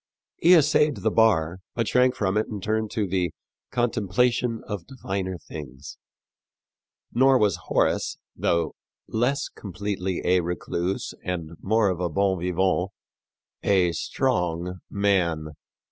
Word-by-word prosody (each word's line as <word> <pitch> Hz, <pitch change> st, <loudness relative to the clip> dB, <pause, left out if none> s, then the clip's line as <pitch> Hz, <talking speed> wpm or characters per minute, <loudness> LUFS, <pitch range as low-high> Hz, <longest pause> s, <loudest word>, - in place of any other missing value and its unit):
He 175 Hz, +2 st, +6 dB
essayed 150 Hz, -1 st, +4 dB
the 110 Hz, -, 0 dB
bar, 95 Hz, -7 st, +3 dB, 0.2 s
but 115 Hz, -2 st, 0 dB
shrank 125 Hz, 0 st, +3 dB
from 100 Hz, -5 st, 0 dB
it 110 Hz, -, +1 dB
and 105 Hz, -4 st, -6 dB
turned 110 Hz, +1 st, 0 dB
to 110 Hz, -2 st, -1 dB
the 90 Hz, -2 st, 0 dB, 0.4 s
"contemplation 120 Hz, +1 st, +1 dB
of 105 Hz, -5 st, -5 dB
diviner 95 Hz, -8 st, -4 dB
things." 70 Hz, -4 st, -9 dB, 1.1 s
Nor 130 Hz, +2 st, +5 dB
was 105 Hz, -5 st, +2 dB
Horace, -, -, +1 dB, 0.2 s
though 85 Hz, -1 st, 0 dB, 0.3 s
less 125 Hz, +6 st, 0 dB
completely 95 Hz, -1 st, -4 dB
a 90 Hz, +1 st, +4 dB
recluse 90 Hz, +1 st, -2 dB
and 85 Hz, -3 st, -3 dB
more 110 Hz, 0 st, +3 dB
of 90 Hz, -2 st, -2 dB
a 90 Hz, -1 st, 0 dB
bon 95 Hz, +3 st, +1 dB
vivant, 90 Hz, +1 st, +1 dB, 0.7 s
a 95 Hz, -3 st, +3 dB
strong 85 Hz, +2 st, -1 dB
man. 90 Hz, -6 st, +1 dB
95 Hz, 125 wpm, -25 LUFS, 90-110 Hz, 1.1 s, He